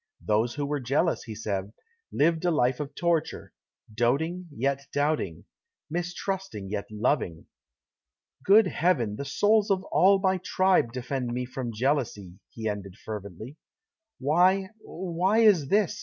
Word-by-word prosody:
Those 110 +4 +1
who 145 0 -2
were 145 0 -2
jealous, 140 +7 0
he 110 -3 -7
said, 100 -1 -4 0.4
lived 165 +2 +2
a 175 - +2
life 130 -6 +1
of 145 -1 -5
torture 170 -2 -1 0.4
doating, 160 +11 0
yet 140 +2 -2
doubting; 145 - -1 0.5
mistrusting, 175 - -4
yet 105 -1 -3
loving. 105 - -1 1.0
"Good 210 +3 +6
Heaven! 155 - +1
the 140 - -5
souls 210 +9 +2
of 190 -1 +1
all 195 +2 +5
my 190 -1 +1
tribe 185 -10 +2
defend 125 0 -3
me 125 0 -2
from 125 -1 -5
jealousy!" 110 -7 -2
he 110 -1 -5
ended 100 -3 -4
fervently. 105 - -8 0.6
"Why 180 +7 +3
why 185 +5 0
is 195 -11 +5
this?" 205 +3 +1
140 Hz, 135 wpm, -27 LUFS, 110-180 Hz, 1.0 s, Good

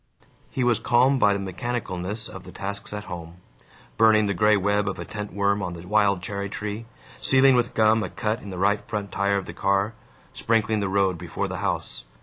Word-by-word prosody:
He 130 - -2
was 120 -2 +3
calmed 130 +3 +3
by 105 - +5
the - - -2
mechanicalness 100 0 -3
of 95 - -9
the - - -11
tasks 100 +1 -6
at 105 0 -5
home: 85 -3 -8 0.6
burning 110 -1 +5
the 100 - 0
gray 105 +3 +4
web 100 +1 +1
of 95 - -5
a - - -6
tent 105 -1 -6
worm 100 0 +1
on 90 -2 -3
the 85 0 -9
wild 100 -2 +2
cherry 100 +1 -4
tree, 105 +2 -5 0.3
sealing 130 - +5
with 125 -1 +1
gum 110 0 +4
a - - -3
cut 105 +5 -2
in 100 - -9
the 95 - -6
right 100 +3 +2
front 105 -2 -4
tire 100 0 +1
of 100 - -3
the - - -8
car, 100 +3 +1 0.4
sprinkling 110 -1 +1
the 100 -2 -1
road 95 -3 +1
before - - -3
the - - -5
house. - - -2
100 Hz, 210 wpm, -25 LUFS, 95-110 Hz, 0.6 s, by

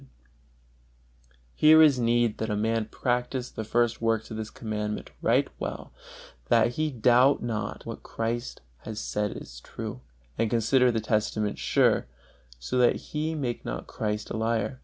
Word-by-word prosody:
Here 155 - +6
there 160 - +9
is 140 -4 +3
need 120 -1 +2
that 110 - -2
a 105 - 0
man 110 +1 0
practise 125 +3 -2
the 110 - -5
first 120 +1 +1
works 115 -1 0
of 110 - -5
this 110 0 -4
Commandment 105 -4 -4
right - - +3
well, - - -5 0.5
that 115 0 +4
he 155 +6 -1
doubt 125 +1 +4
not 105 -3 -3
that - - -17
what - - -7
Christ 115 +2 -4 0.2
has 110 -1 -6
said 105 -1 -2
is - - -10
true, 60 - -7 0.4
and 115 - +2
consider 125 +2 +3
the 115 -1 -1
testament 110 -1 -1
sure, - - +2 0.5
so 65 - -2
that 125 - +5
he 155 +1 -3
make 125 -6 -3
not - - -5
Christ 105 -1 -3
a - - -2
liar. 115 +3 -1
115 Hz, 160 wpm, -27 LUFS, 110-125 Hz, 0.5 s, there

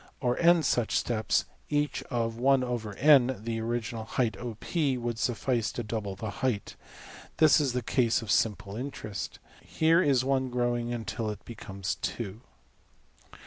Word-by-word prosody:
Or 125 -2 +1
$n$~such 165 -9 +3
steps, 110 -3 +1 0.2
each 150 0 0
of 115 -3 -1
$\dfrac{n}$~of 125 0 +3
the 115 -1 -2
original 115 -1 -3
height~$OP$, 125 - -1
would 120 -2 -3
suffice 120 -1 0
to 120 - -3
double 105 -3 -4
the 105 +1 -5
height. 125 -7 -1 0.6
This 155 0 +6
is 135 -4 0
the 125 -1 -1
case 115 -1 +2
of 105 - -3
simple 105 -2 +1
interest. 110 -5 -5 0.2
Here 165 +2 +3
is 135 -6 +3
$1$~growing 120 -3 0
till 115 -3 -3
it 105 -1 -7
becomes~$2$. 100 0 -5
120 Hz, 125 wpm, -29 LUFS, 110-130 Hz, 0.6 s, This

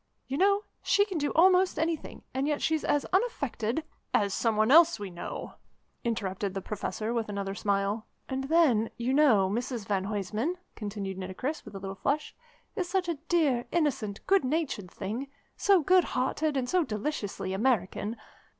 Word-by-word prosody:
You 265 - -4
know, 400 +2 +4 0.2
she 405 +1 +3
can 380 -6 -3
do 290 - 0
almost 370 +2 +5
anything, 320 -1 -2
and 265 +2 0
yet 295 -1 0
she's 315 -1 0
as 290 - +1
unaffected 300 - 0 0.2
" - - -44
"As 200 - -3
some 225 +1 +1
one 215 +3 +3
else 335 +2 +7
we 200 -2 -5
know," 175 - -6 0.5
interrupted 200 -4 -2
the - - 0
Professor 215 +3 -3
with 230 -3 -1
another 200 -1 -3
smile. 200 +2 -1 0.2
"And 265 0 -3
then, 275 -8 +3
you 240 +2 0
know, 255 -10 +5
Mrs 235 +2 -3
van 195 -1 0
Huysman," 210 - -2 0.2
continued 200 -3 -5
Nitocris 190 +12 -4
with 210 -2 -10
a - - -5
little 195 0 -5
flush, 285 +9 -1 0.4
"is 365 -5 -2
such 370 -1 0
a 325 -4 -2
dear, 275 -8 +2
innocent, 260 -11 -1
good 390 -4 +4
natured 260 - -1
thing, 220 +10 -4 0.3
so 390 -3 +4
good 370 +3 +5
hearted 290 +3 0
and 255 -2 0
so 360 +5 +2
deliciously 210 -6 -3
American. 215 0 0
245 Hz, 170 wpm, -29 LUFS, 205-315 Hz, 0.5 s, else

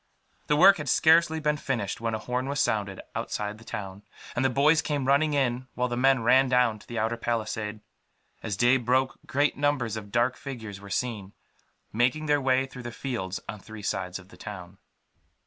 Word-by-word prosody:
The 150 - +3
work 190 +6 +7
had 150 -3 -4
scarcely 160 +2 +4
been 150 -1 0
finished 115 -8 -3
when 115 -1 -1
a - - -1
horn 125 +4 -3
was 140 +1 -2
sounded, 105 -7 0
outside 105 +1 -4
the - - -14
town; 100 -4 -6 0.3
and 120 - +1
the 130 - +3
boys 150 +5 +4
came 145 -4 -2
running 145 +2 +3
in, 130 -2 0
while 125 0 0
the 120 - -2
men 130 -1 +3
ran 130 +3 +5
down 125 -4 +3
to - - -18
the 120 - -6
outer 115 +2 0
palisade. 110 -2 -3 0.6
As 105 -5 -3
day 120 +4 +5
broke, 130 +2 0
great 145 +2 +1
numbers 140 -6 0
of 105 -2 -7
dark 120 +3 +1
figures 115 -8 -7
were 100 - -11
seen, 105 -3 -3 0.6
making 125 +7 +1
their 145 -1 +2
way 130 0 +2
through 135 -1 -10
the 120 0 -6
fields 115 -8 -4
on 105 - -6
three 110 +1 -11
sides 90 -2 -2
of 95 -1 -14
the - - -16
town. 95 -2 -9
120 Hz, 200 wpm, -27 LUFS, 110-135 Hz, 0.6 s, work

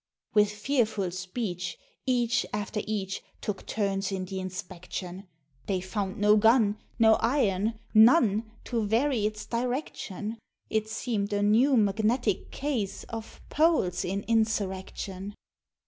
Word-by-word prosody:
With 210 -1 +5
fearful 210 -4 0
speech, 185 -1 -4 0.3
each 240 -2 +2
after 210 +1 -2
each 195 -3 -3 0.2
Took 205 -2 -5
turns 195 -2 -1
in 190 -1 -2
the 190 0 -5
inspection; 185 0 -6 0.4
They 190 -2 +1
found 190 +1 -3
no 210 +1 +5
gun 220 -1 +4 0.2
no 220 -2 +6
iron 225 -4 +1 0.2
none 220 -2 +5
To 235 -3 -1
vary 225 +1 +2
its 215 0 -6
direction; 230 -3 -3 0.3
It 220 0 0
seem'd 220 -2 -2
a 205 0 +1
new 240 +6 +4
magnetic 215 +1 +1
case 260 -9 -2
Of 225 -1 -7
Poles 295 - +2
in 195 +2 -2
Insurrection! 200 -3 -1
210 Hz, 120 wpm, -28 LUFS, 195-230 Hz, 0.4 s, no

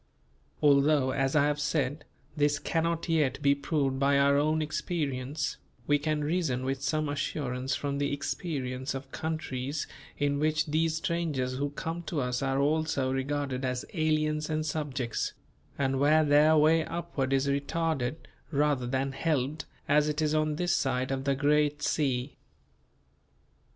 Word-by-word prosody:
Although 140 -1 +4
as 135 +1 0
I 145 -1 +5
have 150 0 0
said, 150 0 -1 0.3
this 145 -1 +2
cannot 165 +2 -1
yet 155 -6 +1
be 140 -1 +4
proved 140 -2 -1
by 140 0 +3
our 140 0 +4
own 155 +2 +2
experience, 150 -3 -2 0.3
we 145 +2 +3
can 150 0 -1
reason 145 -6 0
with 135 0 -2
some 155 +2 0
assurance 135 -3 -2
from 140 -1 -2
the 145 0 0
experience 140 -2 -3
of 135 0 -7
countries 145 -3 -3 0.3
in 145 -1 0
which 155 +1 +1
these 160 +1 +1
strangers 155 -7 -1
who 145 0 0
come 165 +4 -4
to 160 - -1
us 125 -1 -1
are 135 0 0
also 145 -2 +1
regarded 135 -1 -2
as 125 -1 -2
aliens 155 -2 0
and 155 0 -1
subjects; 140 -6 -2 0.4
and 135 -1 0
where 155 +2 +4
their 150 +2 +5
way 160 +2 +5
upward 165 -6 -3
is 135 0 +2
retarded 140 -1 -1 0.3
rather 145 -4 +1
than 135 +2 -1
helped 145 0 -1 0.2
as 150 +1 +3
it 150 0 -2
is 155 -1 +1
on 155 -1 +1
this 175 +2 +1
side 130 -1 0
of 135 0 -2
the 140 -1 +2
great 145 +1 +2
sea. 135 -3 0
145 Hz, 150 wpm, -29 LUFS, 135-155 Hz, 0.4 s, I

